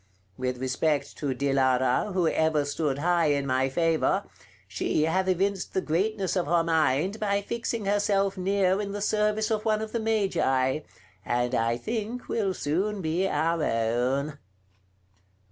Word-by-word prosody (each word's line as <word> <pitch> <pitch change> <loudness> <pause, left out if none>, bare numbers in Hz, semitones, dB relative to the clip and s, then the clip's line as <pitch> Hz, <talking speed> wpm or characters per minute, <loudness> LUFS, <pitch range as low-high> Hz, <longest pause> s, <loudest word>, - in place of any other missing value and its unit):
With 125 +1 -2
respect 140 +3 -1
to 140 -3 -1
Dilara, 130 +4 +1
who 180 -3 +2
ever 160 -2 +1
stood 145 -1 -1
high 170 +1 +2
in 140 -1 +1
my 130 0 +1
favor, 165 +6 +1 0.4
she 95 +10 0
hath 185 +4 +1
evinced 190 +1 0
the 190 - +2
greatness 190 +4 -1
of 180 -5 0
her 170 +1 +3
mind 165 +4 +1
by 200 -1 0
fixing 230 -1 -3
herself 200 -1 +1
near 190 +1 +1
in 200 -1 -4
the 205 - -3
service 210 +1 +1
of 215 -1 0
one 215 -1 +1
of 220 0 -5
the 235 - -1
Magi, 190 -12 +1 0.4
and 120 +1 -1
I 115 -1 +1
think 225 - -4
will 200 -5 -1
soon 190 +8 -1
be 170 +4 0
our 165 0 0
own." 125 +6 0
170 Hz, 150 wpm, -27 LUFS, 140-200 Hz, 0.4 s, her